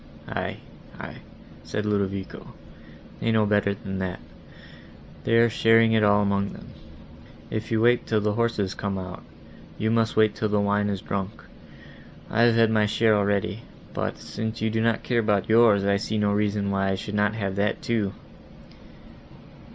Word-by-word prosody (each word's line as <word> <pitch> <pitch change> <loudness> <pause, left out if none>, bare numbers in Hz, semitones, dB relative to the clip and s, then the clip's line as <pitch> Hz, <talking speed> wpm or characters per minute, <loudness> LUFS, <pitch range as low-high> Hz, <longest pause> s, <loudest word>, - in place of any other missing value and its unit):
"Aye—aye," - - -7 0.5
said 105 0 -4
Ludovico, 100 -2 -3 0.6
"they 115 - 0
know 110 -1 +3
better 105 -1 +1
than 95 -3 -6
that; 95 -1 -3 1.1
they 115 - +2
are 115 0 +6
sharing 115 0 +4
it 110 -1 +3
all 105 0 +4
among 100 0 0
them; - - -12 0.8
if 110 0 -3
you 110 - +2
wait 120 +1 +3
till 110 - +2
the 105 0 0
horses 110 -4 0
come 100 -1 -3
out, 90 -1 -7 0.6
you 110 +1 0
must 115 -1 +1
wait 110 -1 +4
till 110 - -2
the 105 0 +1
wine 100 0 +1
is 100 -2 -3
drunk. 100 +2 -4 0.9
I 115 - +2
have 120 -1 +5
had 115 -1 +4
my 105 -1 +3
share 110 +1 +2
already, 100 0 0 0.3
but, - - -3
since 110 0 -5
you 110 0 0
do 110 0 0
not 115 0 +1
care 120 -2 0
about 105 -3 +1
yours, 110 -3 +5
I 100 0 +3
see 110 +2 -3
no 105 -1 +1
reason 100 -1 0
why 95 0 0
I 95 - +1
should 105 +2 -6
not 105 +1 +1
have 100 -3 -3
that 105 +2 -1
too." 110 -4 0
105 Hz, 170 wpm, -25 LUFS, 100-110 Hz, 1.1 s, are